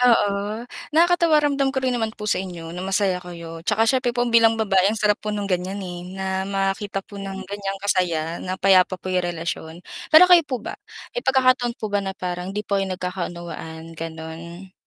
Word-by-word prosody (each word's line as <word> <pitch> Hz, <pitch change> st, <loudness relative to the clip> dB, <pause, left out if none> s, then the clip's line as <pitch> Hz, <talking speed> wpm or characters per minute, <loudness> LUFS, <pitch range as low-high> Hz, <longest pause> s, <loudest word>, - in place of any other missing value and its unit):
Oo, 215 Hz, -2 st, +2 dB, 0.3 s
nakakatuwa. 340 Hz, -1 st, +5 dB
Ramdam 280 Hz, -2 st, +2 dB
ko 270 Hz, 0 st, -1 dB
rin 255 Hz, -, +2 dB
naman 225 Hz, -2 st, -2 dB
po 210 Hz, -, -7 dB
sa 210 Hz, -, +1 dB
inyo 170 Hz, -3 st, -7 dB
na 180 Hz, -, -6 dB
masaya 190 Hz, -1 st, 0 dB
kayo. 170 Hz, -2 st, -9 dB
'Tsaka 210 Hz, +6 st, +2 dB
siyempre 255 Hz, +1 st, +2 dB
po 240 Hz, -, +2 dB
bilang 230 Hz, -1 st, +5 dB
babae 195 Hz, -4 st, +3 dB
ang 215 Hz, -, -1 dB
sarap 210 Hz, -1 st, +2 dB
po 215 Hz, -, -5 dB
no'ng 210 Hz, -1 st, -2 dB
ganiyan, 180 Hz, +2 st, -1 dB
eh, 175 Hz, -1 st, -6 dB, 0.2 s
na 190 Hz, 0 st, -3 dB, 0.2 s
makita 195 Hz, 0 st, -1 dB
po 200 Hz, -1 st, -10 dB
ng 195 Hz, -1 st, -6 dB
ganiyan 195 Hz, 0 st, -4 dB
kasaya, 170 Hz, -4 st, 0 dB
na 185 Hz, 0 st, -3 dB
payapa 190 Hz, -1 st, +4 dB
po 185 Hz, +1 st, -5 dB
'yong 180 Hz, 0 st, +2 dB
relasyon. 165 Hz, -1 st, -4 dB, 0.3 s
Pero 315 Hz, +3 st, +9 dB
kayo 360 Hz, -1 st, +8 dB
po 260 Hz, -, -1 dB
ba? -, -, -4 dB, 0.4 s
May -, -, -2 dB
pagkakataon 255 Hz, -2 st, +3 dB
po 215 Hz, -2 st, -5 dB
ba 205 Hz, -, +2 dB
na 195 Hz, -1 st, -5 dB
parang 180 Hz, +1 st, -4 dB
'di 210 Hz, -, -2 dB
po 200 Hz, -1 st, 0 dB
kayo 195 Hz, -, -2 dB
nagkakaunawaan, 175 Hz, -3 st, -5 dB
gano'n? 165 Hz, +3 st, -8 dB
195 Hz, 200 wpm, -23 LUFS, 180-220 Hz, 0.4 s, Pero